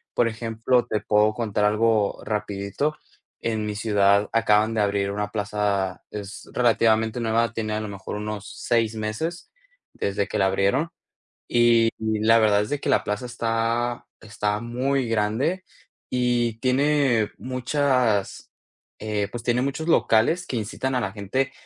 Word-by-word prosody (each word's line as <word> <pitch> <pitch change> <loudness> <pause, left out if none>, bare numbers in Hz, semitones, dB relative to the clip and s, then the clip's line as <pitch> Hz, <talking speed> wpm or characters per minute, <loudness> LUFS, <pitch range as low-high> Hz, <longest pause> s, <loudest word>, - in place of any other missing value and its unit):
por 120 - +3
ejemplo, 115 +2 0
te 105 - -1
puedo 105 +1 +2
contar 105 -2 -1
algo 105 0 +2
rapidito. 105 +7 -2 0.4
En 110 -2 -2
mi 105 -1 -3
ciudad 100 -1 +2
acaban 110 -1 +3
de 110 - +1
abrir 100 -1 0
una 105 0 -3
plaza, 105 -3 -1
es 100 -1 -8
relativamente 115 -1 +2
nueva, 115 0 +1
tiene 110 -2 -3
a - - -1
lo 110 - -4
mejor 100 0 -6
unos 105 -1 -5
6 115 -2 0
meses 110 +11 -4 0.4
desde 100 0 -2
que - - -3
la 95 - +3
abrieron, 100 +12 +1 0.6
y 120 -1 +4
la 110 +1 +3
verdad 105 -2 +4
es 105 - -4
de 145 - -1
que - - -5
la - - +3
plaza 105 +4 -3
está 120 0 -1
está 105 -1 -2
muy 125 +2 -1
grande 115 - 0 0.4
y 120 -2 0
tiene 130 -3 +2
muchas, 130 -4 0 0.5
eh, 105 -1 -2
pues, 120 -1 -7
tiene 120 +1 +1
muchos 140 +5 -2
locales 165 +5 +3
que - - -4
incitan 120 +4 -2
a 125 - +1
la 95 - -2
gente 110 +7 -2
110 Hz, 150 wpm, -24 LUFS, 105-120 Hz, 0.6 s, y